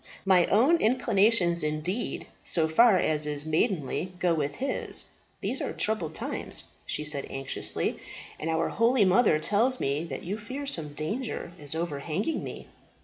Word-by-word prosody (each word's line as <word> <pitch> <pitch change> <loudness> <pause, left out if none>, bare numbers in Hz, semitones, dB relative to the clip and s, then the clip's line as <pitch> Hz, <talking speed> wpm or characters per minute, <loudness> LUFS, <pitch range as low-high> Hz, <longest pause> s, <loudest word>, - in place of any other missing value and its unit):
My 185 -3 +5
own 260 - +5
inclinations 210 - +3
indeed, 155 +9 -2 0.2
so 160 -2 +2
far 200 +6 +6
as 155 -3 +1
is 150 0 -3
maidenly, 165 - 0
go 175 -1 +2
with 145 -3 -1
his. 275 - -2 0.4
These - - -2
are - - -2
troubled 195 -8 -1
times," - - -2 0.2
she 150 - -2
said 145 -2 -1
anxiously, 135 0 -2 0.4
"and 160 - -3
our 165 0 +1
holy 230 -1 +3
mother 190 -2 +4
tells 225 +10 +1
me 140 +3 0
that 135 -5 -6
you 200 +5 -3
fear 260 +7 -6
some 160 - -2
danger 210 - -3
is 145 +1 -5
overhanging 165 - -2
me." - - -7
175 Hz, 150 wpm, -28 LUFS, 155-220 Hz, 0.4 s, far